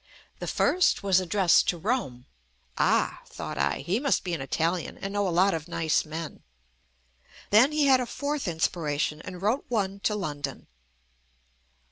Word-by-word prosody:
The - - -5
first 365 - +2
was 190 -2 +3
ad 180 - -7
dressed 195 -5 +4
to 175 - 0
Rome. 165 - -2 0.5
Ah! - - +1
thought - - -6
I, - - 0
he 195 +6 0
must 280 0 +1
be 180 -2 -3
an 160 - -2
Italian 165 +5 -1
and 195 0 -5
know 205 -1 +1
a - - 0
lot 185 +3 +3
of 160 -1 -4
nice 165 -2 0
men. 160 0 -6 1.1
Then 235 +8 +6
he 305 -1 +2
had 265 -2 +5
a 250 - -2
fourth 285 -2 -3
inspiration 160 -2 -1
and 180 +1 -9
wrote 225 +7 +1
one 200 -4 -1
to 210 +1 0
London. 150 -8 -4
185 Hz, 165 wpm, -27 LUFS, 165-220 Hz, 1.1 s, Then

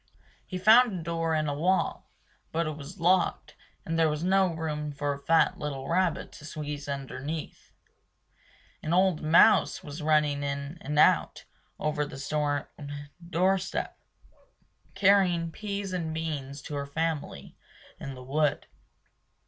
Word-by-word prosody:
He 185 - -4
found 220 +1 +5
a - - -7
door 165 -1 -1
in 155 -1 0
a 145 - -1
wall; 180 +6 0 0.4
but 165 +1 0
it 155 -1 -3
was 155 +6 -10
locked 180 +1 +2 0.3
and 165 0 -1
there 160 -1 +4
was 150 +1 -2
no 190 0 +3
room 150 -2 -3
for 145 0 -2
a 140 - -9
fat 165 +3 +3
little 140 -3 -4
rabbit 180 -1 0
to - - -13
squeeze 145 -1 -6
underneath. 140 +3 -6 1.1
An 155 - -2
old 185 -3 +3
mouse 165 +8 +5
was 150 +2 -7
running 150 -2 +2
in 140 +3 -4
and 150 +2 -3
out - - +3 0.3
over 150 -1 0
the 145 -1 -7
stone 145 0 -1 0.6
doorstep, 190 +2 0 1.0
carrying 185 -4 +3
peas 200 0 -4
and 165 -3 -2
beans 145 -3 -4
to - - -7
her 140 -1 -3
family 160 +1 -3 0.4
in 135 - -6
the 125 - -10
wood. 145 +3 0
155 Hz, 140 wpm, -28 LUFS, 145-175 Hz, 1.1 s, found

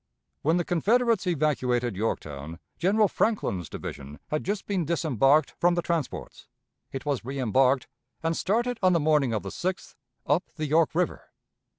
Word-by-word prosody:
When 160 +4 +2
the 175 - 0
Confederates 220 +4 +2
evacuated 130 - +1
Yorktown, 80 -7 -3 0.2
General 205 +5 +3
Franklin's 100 - -1
division 70 +1 -7
had 155 - -1
just 200 +1 -2
been 195 -4 0
disembarked 150 -3 +2
from 175 0 +3
the 175 - -1
transports. 165 -5 -3 0.4
It 135 - -6
was 140 -5 -1
reembarked, 130 0 +2 0.4
and 165 0 +1
started 235 +7 0
on 185 -1 +4
the 170 - +3
morning 150 -4 +2
of 110 -2 -1
the 100 - -5
6th 185 - -4 0.3
up 155 +6 +1
the 155 - -3
York 155 +2 +2
River. 180 0 -1
155 Hz, 155 wpm, -27 LUFS, 130-180 Hz, 0.4 s, on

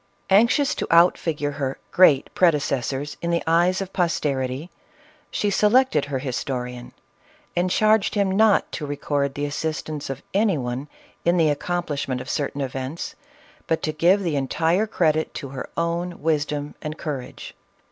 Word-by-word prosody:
Anxious 245 +8 +4
to - - -3
out 170 +2 +6
figure 150 -3 -2
her 140 -2 -3
" - - -39
great" 150 -7 +5
prede 175 -4 +4
cessors 140 0 -2
in 170 - -2
the 170 0 +1
eyes 175 +3 +3
of 195 -1 -6
posterity, 145 -4 -1 0.6
she 205 - -1
selected 215 - +3
her 135 -3 -3
histo 130 0 -3
rian, 125 0 -8 0.7
and 175 +1 +1
charged 215 +2 +3
him 200 -2 +2
not 210 +1 +3
to 150 - -5
record 140 -1 -1
the 145 0 -2
assistance 155 0 -4
of 135 +1 -5
any 200 -3 +2
one 125 +2 -4 0.4
in 170 +1 +3
the 160 -2 +4
accomplishment 145 -4 -2
of 125 +2 -5
certain 145 -1 -2
events, 135 +4 -4 0.5
but 160 - 0
to 155 - 0
give 180 +6 +3
the 165 -4 -1
entire 165 +9 +1
credit 160 -6 +1
to 140 - -5
her 130 -1 -6
own 170 +1 -2
wisdom 150 -2 -1
and 155 +1 -5
cour 145 -5 -3
age. 125 - -10
155 Hz, 165 wpm, -23 LUFS, 140-180 Hz, 0.7 s, out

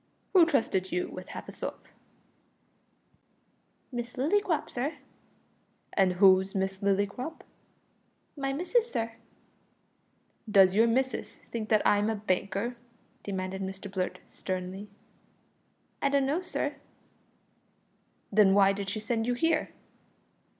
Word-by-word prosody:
"Who 355 -4 +7
trusted 195 - +1
you 180 0 -1
with 185 - -8
half - - -7
a - - -7
sov?" - - -5 2.2
"Miss 240 -1 -4
Lillycrop, 320 +3 +1
sir." 270 +6 -3 1.0
"And 190 -2 +3
who's 190 +1 +5
Miss 190 0 -1
Lillycrop?" 200 +9 -1 0.9
"My 275 -2 -2
missis, 445 - +1
sir." 230 0 -1 1.4
"Does 195 -3 +6
your 225 +3 +5
missis 260 +2 -1
think 220 -2 -4
that 215 -2 +3
I'm 205 +1 +3
a 225 - 0
banker?" 200 +3 -1 0.4
demanded 190 -1 -4
Mr 190 +1 -6
Blurt 185 -2 -2
sternly. 185 +2 -5 1.1
"I 280 - +3
dun 280 -1 +2
know, 300 +6 0
sir." 360 - -3 1.5
"Then 200 -2 +5
why 195 -1 +6
did 200 -1 -4
she 210 +3 -3
send 225 +1 -1
you 245 - +1
here?" 325 +4 +1
210 Hz, 115 wpm, -29 LUFS, 195-265 Hz, 2.2 s, Who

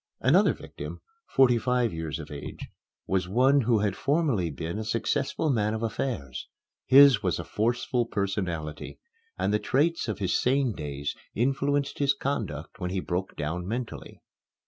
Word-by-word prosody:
Another - - +4
victim, - - -8 0.3
forty 125 -3 +4
five 125 -3 +1
years 80 -2 -4
of 75 -2 -9
age, 70 -1 -7 0.4
was 95 -1 0
one 130 +7 +4
who 115 -1 +3
had 100 -2 0
formerly 135 - +1
been 80 +6 -4
a - - -3
successful 135 +6 0
man 110 -3 +1
of 110 - -4
affairs. 105 - -3 0.4
His 135 -4 +8
was 90 -5 0
a - - -4
forceful 120 +2 0
personality, 90 -8 -3 0.4
and - - 0
the 105 - +3
traits 155 +7 +1
of 110 - -2
his 95 -4 0
sane 130 -2 +2
days 75 -3 -4 0.2
influenced 140 +3 0
his 140 -1 +3
conduct 100 - -4
when 90 -2 -2
he 95 +1 -1
broke 90 +1 -3
down 85 +4 -3
mentally. 120 +2 -5
110 Hz, 155 wpm, -27 LUFS, 90-130 Hz, 0.4 s, His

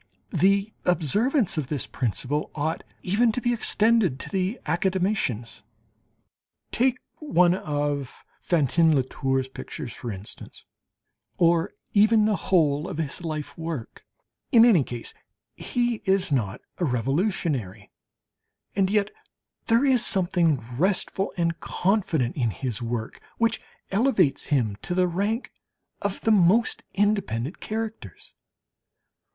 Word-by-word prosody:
The 200 +2 +2
observance 180 - +1
of 140 - -3
this 145 -2 -2
principle 130 +4 -2
ought 155 +2 -2 0.2
even 225 +6 +3
to 250 - -1
be 240 0 +1
extended 220 - +2
to - - -6
the 195 +4 -1
academicians. 175 - -1 1.1
Take 255 +1 +2 0.2
one 180 - +3
of 145 -5 -3 0.2
Fantin 160 0 +3
Latour's 135 0 0
pictures, 130 0 -7
for 120 - -6
instance, 100 +1 -9 0.7
or 170 -1 +3 0.2
even 215 +1 +5
the 215 -1 +2
whole 155 -5 +1
of - - -5
his 160 +2 -4
life 155 -3 -4
work! 160 -7 -6 0.5
In 235 -3 +8
any 200 - +5
case 120 -2 -7 0.4
he 240 -1 -1
is 190 -3 +2
not 110 -8 -1 0.2
a - - 0
revolutionary, 130 - -1 0.8
and 195 -1 +2
yet 205 0 +1 0.6
there 230 +4 +4
is 255 -3 +4
something 175 - +2
restful 190 +1 +1
and 170 -1 0
confident 180 - 0
in 120 -5 +1
his 120 +5 -3
work, 115 -1 -4 0.2
which 230 0 +1 0.3
elevates 195 - +2
him 115 -9 +1
to 175 - -3
the 180 0 +3
rank 205 +7 -2 0.5
of 200 -1 -3
the 225 - +2
most 205 +3 +3
independent 190 - 0
characters. 225 0 -6
175 Hz, 120 wpm, -25 LUFS, 140-210 Hz, 1.1 s, In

